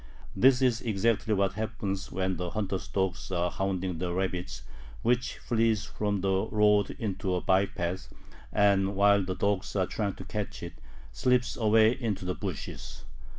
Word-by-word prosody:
This 130 0 +5
is 120 -3 +2
exactly 110 0 0
what 100 -1 +1
happens 105 -2 -4
when 95 -1 -1
the 90 0 -3
hunter's 100 -1 -3
dogs 95 -1 -2
are 90 -1 0
hounding 95 -3 -2
the 90 0 -2
rabbit 90 -7 -3 0.4
which 125 +2 +1
flees 115 -2 +1
from 105 -3 -2
the 95 +2 +1
road 105 -2 +3
into 95 -3 -2
a 90 - -1
by 95 +1 +3
path, 95 -1 -4 0.4
and, 100 -1 +3
while 100 0 +4
the 95 0 -3
dogs 100 0 -1
are 95 -2 +2
trying 100 0 -2
to - - -9
catch - - -5
it, - - -6 0.4
slips 125 -1 +1
away 110 0 +4
into 115 -7 -3
the 90 - -1
bushes. 90 -9 -6
100 Hz, 160 wpm, -29 LUFS, 95-110 Hz, 0.4 s, This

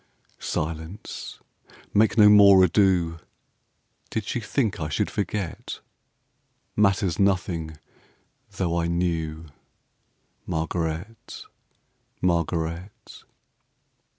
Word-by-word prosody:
Silence! 80 +5 -5 0.6
make 110 +3 +3
no 105 -2 +8
more 100 -2 +8
ado! 90 -3 +2 0.9
Did 110 -3 -3
she 120 - -2
think 110 -2 -1
I 75 -2 -3
should 70 - -1
forget? 100 -2 -4 1.0
Matters 100 -4 +2
nothing, 85 -5 0 0.8
though 85 -2 0
I 85 - 0
knew, 85 -2 -2 1.0
Margaret, 85 +4 -4 0.8
Margaret. 85 +1 -2
90 Hz, 75 wpm, -25 LUFS, 80-100 Hz, 1.0 s, no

